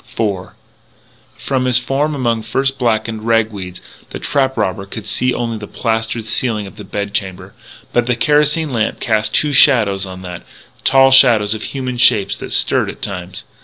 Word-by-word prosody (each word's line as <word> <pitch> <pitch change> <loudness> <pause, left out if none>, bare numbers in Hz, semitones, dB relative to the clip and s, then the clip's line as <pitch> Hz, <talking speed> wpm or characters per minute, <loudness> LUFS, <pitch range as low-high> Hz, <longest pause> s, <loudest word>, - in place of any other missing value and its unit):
IV 100 -5 -1 0.9
From 130 -2 -2
his 125 -2 +3
form 140 +4 -1
among 120 -4 0
frost 135 +5 -2
blackened 110 -2 -1
rag 115 -1 +2
weeds, 90 -3 -8 0.3
the - - -6
trap 135 -2 -1
robber 100 -2 -2
could 110 +1 -8
see 125 +4 0
only 115 -2 -3
the 105 - -8
plastered 115 -1 -2
ceiling 110 -2 -1
of 95 - -12
the 105 - -8
bed 100 +1 -5
chamber. 95 -2 -4 0.4
But 120 0 +1
the 125 - +1
kerosene 150 +4 +2
lamp 115 -3 -1
cast 110 -1 0
two 150 -1 +2
shadows 105 -9 +4
on 95 0 -9
that 90 -1 -7 0.4
tall 135 0 +5
shadows 115 -6 +5
of 110 - -6
human 130 -3 -4
shapes 115 -4 +4
that - - -8
stirred - - +2
at - - -9
times. 90 -1 -5
115 Hz, 175 wpm, -16 LUFS, 105-130 Hz, 0.9 s, tall